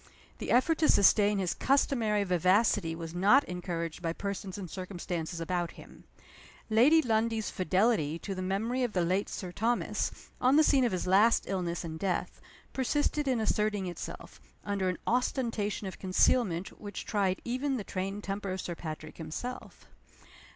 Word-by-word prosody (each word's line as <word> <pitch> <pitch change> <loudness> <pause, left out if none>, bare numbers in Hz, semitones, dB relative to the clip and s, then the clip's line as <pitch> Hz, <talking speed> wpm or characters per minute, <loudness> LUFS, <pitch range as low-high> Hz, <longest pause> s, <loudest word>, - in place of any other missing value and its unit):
The - - -5
effort 285 +7 +3
to 315 - +3
sustain 205 +1 +5
his 185 -3 0
customary 235 -6 +1
vivacity 185 -1 +2
was 165 0 -7
not 205 +11 +5
encouraged 175 -2 -4
by 165 -1 -1
persons 200 0 -5
and 195 -3 -6
circumstances 175 -2 -5
about 175 0 -2
him. - - -15 0.7
Lady 285 +9 +6
Lundie's 225 -1 0
fidelity 185 -4 +1
to 195 +4 -5
the 185 - -5
memory 215 +7 -1
of 245 -4 -1
the 180 -2 +1
late 185 +4 0
Sir 180 -2 -5
Thomas, 230 +6 0 0.3
on 255 +2 +4
the 310 - +6
scene 275 -3 +4
of 235 - +1
his 185 - -2
last 200 +5 +4
illness 180 -3 -2
and 160 -1 -6
death, 185 -1 -2 0.3
persisted 290 +2 0
in 255 -3 +2
asserting 210 -2 0
itself, 175 -2 -8 0.2
under 200 -2 0
an 180 - -2
ostentation 230 -4 -1
of 190 - -7
concealment 190 -1 +1
which 205 -2 -6
tried 195 -3 0
even 260 +3 -1
the 215 - -4
trained 195 +2 -4
temper 195 0 -3
of 190 - -4
Sir 175 - -4
Patrick 155 -2 -7
himself. 205 +11 -7
200 Hz, 160 wpm, -30 LUFS, 180-230 Hz, 0.7 s, Lady